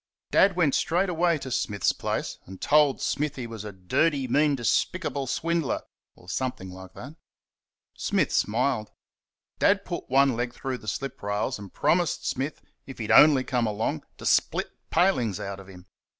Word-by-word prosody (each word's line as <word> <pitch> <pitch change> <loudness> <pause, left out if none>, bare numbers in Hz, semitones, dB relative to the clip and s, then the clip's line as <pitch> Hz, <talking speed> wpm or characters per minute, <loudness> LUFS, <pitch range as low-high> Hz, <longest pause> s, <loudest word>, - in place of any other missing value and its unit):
Dad 190 -1 +5
went 160 -6 +2
straightaway 175 -1 +1
to 135 -2 -7
Smith's 105 -5 0
place, - - -3
and 95 0 -10
told 150 -2 +3
Smith 150 0 -1
he 125 - -5
was 115 -3 -7
a 105 - -6
dirty, 130 - 0
mean, 145 +3 +3
despicable 140 +3 -1
swindler 165 +2 -1 0.3
or 90 - -19
something 95 -3 -3
like 95 0 -12
that. 145 +6 -10 0.8
Smith - - 0
smiled. 115 0 0 0.7
Dad - - +3
put - - -5
one 135 -1 +4
leg 120 +1 -3
through 130 -2 -4
the 110 - -14
slip 135 +5 -4
rails 105 +4 -2
and 100 -2 -10
promised 175 -2 +1
Smith, 140 +3 -3 0.2
if 135 - -9
he'd 110 -1 -3
only 145 +2 +7
come 125 -3 0
along, 105 -6 -2
to - - -10
split - - +1 0.2
palings 125 - +2
out 100 0 -5
of 95 - -12
him. 90 -2 -13
130 Hz, 165 wpm, -26 LUFS, 105-150 Hz, 0.8 s, only